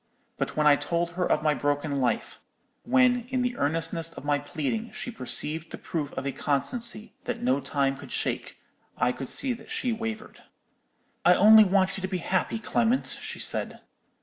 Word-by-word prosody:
But -, -, -3 dB
when 150 Hz, -, +2 dB
I 145 Hz, -1 st, +7 dB
told 170 Hz, +3 st, -1 dB
her 180 Hz, +1 st, -1 dB
of -, -, +2 dB
my 155 Hz, -1 st, +3 dB
broken 145 Hz, -1 st, -1 dB
life—when, 245 Hz, -, 0 dB
in 255 Hz, -1 st, 0 dB
the 245 Hz, 0 st, -1 dB
earnestness 165 Hz, 0 st, 0 dB
of 145 Hz, -, -10 dB
my 145 Hz, 0 st, +2 dB
pleading, 160 Hz, +10 st, -3 dB
she 245 Hz, -, -5 dB
perceived 155 Hz, -, -2 dB
the -, -, -7 dB
proof 150 Hz, -4 st, -4 dB
of 130 Hz, -, -4 dB
a 140 Hz, -, 0 dB
constancy 215 Hz, -, -1 dB
that -, -, -3 dB
no 130 Hz, +3 st, +2 dB
time 135 Hz, 0 st, 0 dB
could -, -, -11 dB
shake, -, -, -2 dB, 0.4 s
I 125 Hz, 0 st, +2 dB
could 125 Hz, +1 st, -6 dB
see 265 Hz, -2 st, 0 dB
that 225 Hz, -1 st, -12 dB
she 250 Hz, -, -1 dB
wavered. 225 Hz, -1 st, -6 dB, 0.8 s
"'I 180 Hz, +1 st, +6 dB
only 215 Hz, +3 st, +8 dB
want 190 Hz, -1 st, +2 dB
you -, -, -6 dB
to 190 Hz, -, -2 dB
be 185 Hz, -1 st, -2 dB
happy, 185 Hz, +5 st, -1 dB
Clement,' 235 Hz, +2 st, 0 dB
she -, -, -5 dB
said. -, -, -3 dB
170 Hz, 180 wpm, -27 LUFS, 145-225 Hz, 0.8 s, only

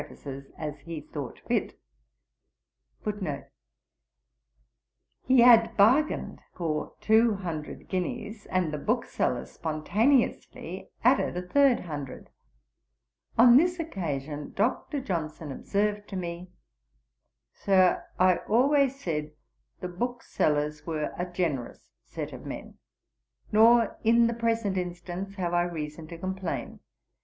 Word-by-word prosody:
'He 255 Hz, -1 st, +6 dB
had 235 Hz, -2 st, +6 dB
bargained 255 Hz, +10 st, +3 dB, 0.2 s
for 155 Hz, -4 st, -2 dB
two 220 Hz, +1 st, +4 dB
hundred 165 Hz, -6 st, -6 dB
guineas, 200 Hz, +3 st, -4 dB
and 180 Hz, -4 st, 0 dB
the 150 Hz, -, -2 dB
booksellers 65 Hz, -, -1 dB
spontaneously 205 Hz, -, 0 dB
added -, -, +3 dB
a 180 Hz, 0 st, -5 dB
third 275 Hz, +2 st, +4 dB
hundred; 145 Hz, -6 st, -7 dB, 1.1 s
on 240 Hz, +1 st, +8 dB
this 355 Hz, +4 st, +2 dB
occasion 150 Hz, -, -4 dB
Dr. 255 Hz, +6 st, 0 dB
Johnson 160 Hz, -, -4 dB
observed 205 Hz, +7 st, -1 dB
to 195 Hz, -, -7 dB
me, 175 Hz, 0 st, -5 dB, 1.0 s
"Sir, 185 Hz, -2 st, +3 dB
I 185 Hz, -1 st, +4 dB
always 275 Hz, +3 st, +2 dB
said 150 Hz, -, -3 dB, 0.5 s
the 180 Hz, -, -3 dB
booksellers 155 Hz, -8 st, -1 dB
were 155 Hz, -1 st, -3 dB
a 180 Hz, -, -3 dB
generous 160 Hz, -9 st, -3 dB
set -, -, -6 dB
of -, -, -9 dB
men. -, -, -8 dB, 0.7 s
Nor, 230 Hz, +2 st, +5 dB
in 235 Hz, +1 st, +5 dB
the 235 Hz, -, +1 dB
present 225 Hz, -4 st, 0 dB
instance, 180 Hz, +2 st, -5 dB
have 175 Hz, -3 st, -2 dB
I 175 Hz, -, +4 dB
reason 155 Hz, -2 st, -4 dB
to 170 Hz, -, -8 dB
complain. 185 Hz, 0 st, -4 dB
185 Hz, 100 wpm, -28 LUFS, 160-230 Hz, 1.1 s, on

